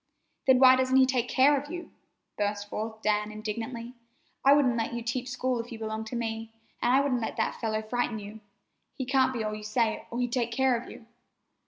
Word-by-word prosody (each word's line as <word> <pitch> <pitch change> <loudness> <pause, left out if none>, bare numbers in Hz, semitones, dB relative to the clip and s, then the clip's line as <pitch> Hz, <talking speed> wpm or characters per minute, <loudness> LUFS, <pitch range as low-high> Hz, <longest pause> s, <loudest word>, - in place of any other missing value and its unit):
"Then, 260 -1 +7
why 260 0 +8
doesn't 260 0 +1
he 265 - +7
take 255 -2 0
care 275 +2 +5
of 285 +1 -4
you?" 345 +1 -7 0.4
burst 205 0 -2
forth 220 +1 -5
Dan 210 0 +1
indignantly. 230 +3 -5 0.5
"I 275 - +6
wouldn't 270 -5 +3
let 230 0 -2
you 235 - -4
teach 245 +2 -3
school 250 0 -1
if 230 +1 -6
you 230 - -6
belonged 220 0 -4
to 240 - -5
me, 225 -1 -3 0.3
and 240 - +2
I 265 - +5
wouldn't 260 -4 0
let 225 - -4
that - - -1
fellow 220 -1 -1
frighten 240 0 -1
you. 210 +1 -9 0.6
He 260 - -4
can't 260 0 +3
be 235 -4 -3
all 215 0 -2
you 215 - -6
say, 220 +1 0
or 235 - -5
he'd 245 -1 -1
take 240 -2 0
care 260 +1 +2
of 235 +1 -5
you." 225 - -12
235 Hz, 220 wpm, -28 LUFS, 220-255 Hz, 0.6 s, why